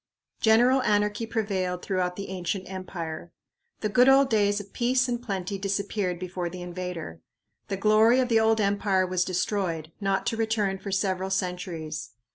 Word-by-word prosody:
General 245 +4 +5
anarchy 210 0 +1
prevailed 195 -5 -2
throughout 180 -2 -1
the 200 0 -6
ancient 185 +1 -3
empire. 175 -3 -6 0.5
The 215 - 0
good 250 +5 +5
old 270 -1 +5
days 205 -1 +3
of 200 -1 -11
peace 250 +1 +2
and 240 -1 -2
plenty 195 -4 -3
disappeared 200 -2 -1
before 180 -1 -4
the 180 +1 -7
invader. 175 - -6 0.5
The 195 - -3
glory 215 +4 +5
of 255 - +2
the 230 -2 +4
old 220 0 +3
empire 200 -2 +2
was 180 0 0
destroyed, 180 -3 -2
not 195 -1 0
to 225 - -1
return 215 -4 0
for 200 - -6
several 190 -1 0
centuries. 180 -4 -3
195 Hz, 160 wpm, -26 LUFS, 180-220 Hz, 0.5 s, General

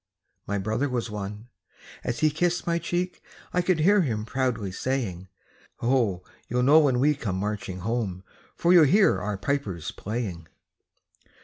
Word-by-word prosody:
My 100 - -1
brother 110 +8 -1
was 120 -3 -2
one. 105 +3 -6 0.5
As 120 - -3
he 155 -1 +4
kissed 175 +3 0
my 170 0 +1
cheek, 175 +2 -2 0.3
I 180 - +3
could 175 -3 +1
hear 200 +5 +5
him 110 -9 -1
proudly 115 -5 -1
saying: 95 -5 -3 0.5
"Ho! 115 -8 +1 0.2
you'll 125 +1 0
know 145 +5 +7
when 135 -5 +3
we 150 +3 +4
come 115 -9 -3
marching 95 -2 -3
home, 100 -4 -2 0.3
For 175 +1 +3
you'll 170 -4 +8
hear 195 +8 +4
our 105 -1 -2
pipers 100 - -2
playing." 100 -7 -5
120 Hz, 150 wpm, -26 LUFS, 100-150 Hz, 0.5 s, you'll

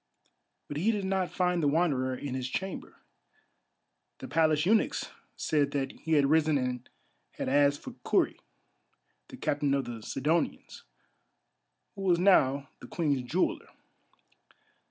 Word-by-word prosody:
But 145 - -5
he 185 +9 +1
did 205 -3 0
not 190 -1 0
find 180 -1 0
the 150 - +2
Wanderer 140 -5 +1
in 135 0 -5
his 130 -1 -3
chamber. 190 +6 -5 1.2
The - - -8
Palace 155 -1 +2
eunuchs 220 +4 +1 0.2
said 145 -3 +1
that 135 -2 -1
he 160 - -4
had 145 -2 +5
risen 155 +1 +3
and 125 -2 -3 0.4
had - - -4
asked 145 +1 +3
for - - -7
Kurri, - - +1 0.9
the - - -11
Captain 145 -1 0
of 140 - -1
the 115 -2 -7
Sidonians, 155 +9 -2 1.1
who 195 - -9
was 180 -3 +3
now 140 -7 +3
the - - -11
Queen's 145 -6 0
Jeweller. 150 +9 -1
150 Hz, 135 wpm, -29 LUFS, 135-175 Hz, 1.2 s, had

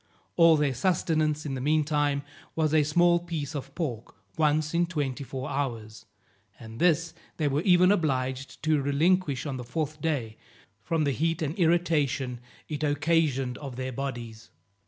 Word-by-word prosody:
All 165 -2 +6
their 145 -2 +1
sustenance 155 0 0
in 140 - -3
the 130 - -4
meantime 145 -1 +1 0.3
was 155 -1 +1
a 155 - +5
small 170 +4 +3
piece 165 -4 -5
of 145 -3 -6
pork 125 -10 -4 0.2
once 155 0 +1
in 170 0 +2
twenty 145 -5 -3
four 130 -1 -5
hours, 115 -5 -4 0.5
and 110 -1 -10
this 165 -1 +2 0.2
they 155 - +1
were 140 +1 +1
even 180 0 +5
obliged 135 -8 -1
to 155 -2 +2
relinquish 145 +1 +1
on 140 -3 -3
the 125 - -6
fourth 150 +4 -4
day, 130 -9 -2 0.4
from 165 -2 0
the 140 - +1
heat 165 +4 -1
and 150 0 -2
irritation 150 -7 +1 0.3
it 155 -1 -4
occasioned 145 -4 +1
of 135 -4 -7
their 130 +1 -4
bodies. 120 -4 -6
150 Hz, 155 wpm, -27 LUFS, 135-165 Hz, 0.5 s, All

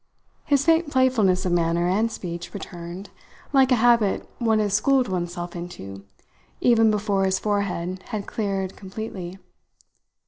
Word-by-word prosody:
His 280 -1 +2
faint 330 -1 +3
playfulness 225 -9 +2
of 180 - 0
manner 170 0 +1
and 215 +5 +1
speech 175 -2 -6
returned, 175 0 -8 0.4
like 265 -1 +5
a - - +6
habit 230 -3 +3
one 225 -2 +2
has 210 -2 0
schooled 260 +5 +3
oneself 175 -1 -4
into, 100 - -8 0.5
even 225 -2 +4
before 205 -2 +1
his 190 0 +1
forehead 185 -3 -2
had 210 -2 -4
cleared 195 -3 -3
completely. 190 -2 -7
200 Hz, 135 wpm, -24 LUFS, 175-225 Hz, 0.5 s, a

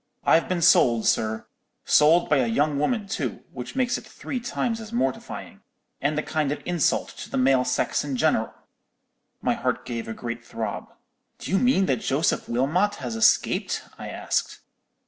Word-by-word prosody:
I've 165 - +3
been 180 -2 0
sold, 120 -9 +5
sir—sold 150 +8 +1
by 150 - +3
a 130 -3 +2
young 145 +5 +1
woman 215 - 0
too, 135 - -3
which 125 0 -8
makes 255 -2 +1
it - - -15
three 255 - -6
times 235 -1 -2
as 220 0 -9
mortifying, 135 - -3 0.4
and 145 +2 0
a 155 - 0
kind 150 -3 -1
of 150 - -3
insult 175 -4 +1
to - - -7
the - - -3
male 130 0 +4
sex 125 0 0
in 140 -2 -3
general!' 140 -6 +1 0.9
"My - - +2
heart - - -2
gave 115 -2 -4
a 110 - -4
great 120 0 -6
throb. 110 -3 -5 0.5
"'Do - - -7
you 195 - +3
mean 245 -6 +3
that 130 -8 +1
Joseph 140 +4 0
Wilmot 160 +13 +1
has 125 - -5
escaped? 110 - +2 0.2
I - - -6
asked. - - -2
145 Hz, 170 wpm, -25 LUFS, 120-180 Hz, 0.9 s, sold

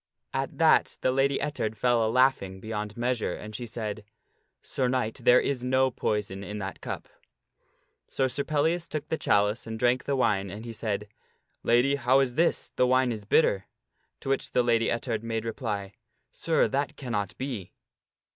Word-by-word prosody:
At - - -2
that - - +4
the 130 - +2
Lady 135 +1 +2
Ettard 110 -7 -2
fell 120 -2 +3
a 110 - +1
laughing 115 -6 +2
beyond 105 0 -5
measure, 120 -5 -1
and 105 0 -9
she 120 +2 -5
said, 110 -2 -5 0.3
" - - -47
Sir 130 - -1
Knight, 125 -3 -1
there 125 +1 +6
is 135 -3 -1
no 130 +1 +2
poison 100 -4 -2
in 105 +1 -6
that 95 -2 -6
cup." - - -5 1.0
So 135 - +1
Sir 130 +3 -2
Pellias 160 +4 0
took 155 -1 -5
the 160 - 0
chalice 105 +3 +2
and 110 0 -4
drank 125 +2 +2
the 140 - 0
wine, 100 -7 +1
and 105 +4 -8
he 115 - -6
said, 105 -2 -3 0.3
" - - -48
Lady> 125 +4 +3
how 135 0 +4
is 130 -3 +1
this? 170 +6 +1
The 125 - +4
wine 130 0 +3
is 105 -3 -5
bitter." 100 -5 +3 0.6
To - - -5
which 135 - -1
the 125 - +4
Lady 115 -1 +2
Ettard 115 -2 -1
made 115 -1 -3
reply, 105 -4 -3 0.2
" - - -49
Sir, 165 -1 +1
that 140 +1 -1
cannot 105 -7 -3
be." 125 -9 -5
120 Hz, 185 wpm, -27 LUFS, 105-130 Hz, 1.0 s, there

